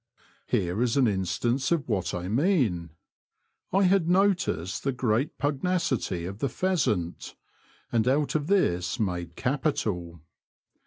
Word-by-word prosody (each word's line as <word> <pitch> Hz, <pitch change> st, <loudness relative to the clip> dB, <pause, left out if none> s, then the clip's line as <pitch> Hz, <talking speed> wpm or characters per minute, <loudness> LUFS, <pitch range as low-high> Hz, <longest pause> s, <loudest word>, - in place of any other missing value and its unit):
Here 100 Hz, -3 st, 0 dB
is 125 Hz, +1 st, +1 dB
an 130 Hz, -3 st, +4 dB
instance 120 Hz, -, 0 dB
of 165 Hz, -4 st, +1 dB
what 105 Hz, -6 st, -1 dB
I 90 Hz, 0 st, -4 dB
mean: 115 Hz, -, +1 dB, 0.8 s
I 195 Hz, +2 st, +3 dB
had 185 Hz, -2 st, +3 dB
noticed 180 Hz, -, +1 dB
the 135 Hz, -, +1 dB
great 125 Hz, +1 st, 0 dB
pug 145 Hz, -1 st, -1 dB
nacity 130 Hz, -, -1 dB
of 100 Hz, +2 st, -7 dB
the 140 Hz, -, 0 dB
pheasant, 125 Hz, -, -1 dB, 0.6 s
and 115 Hz, 0 st, +1 dB
out 140 Hz, +3 st, +2 dB
of 150 Hz, -1 st, -1 dB
this 90 Hz, -, +1 dB
made 90 Hz, -5 st, -2 dB
capital. 105 Hz, -, -1 dB
125 Hz, 135 wpm, -27 LUFS, 90-150 Hz, 0.8 s, an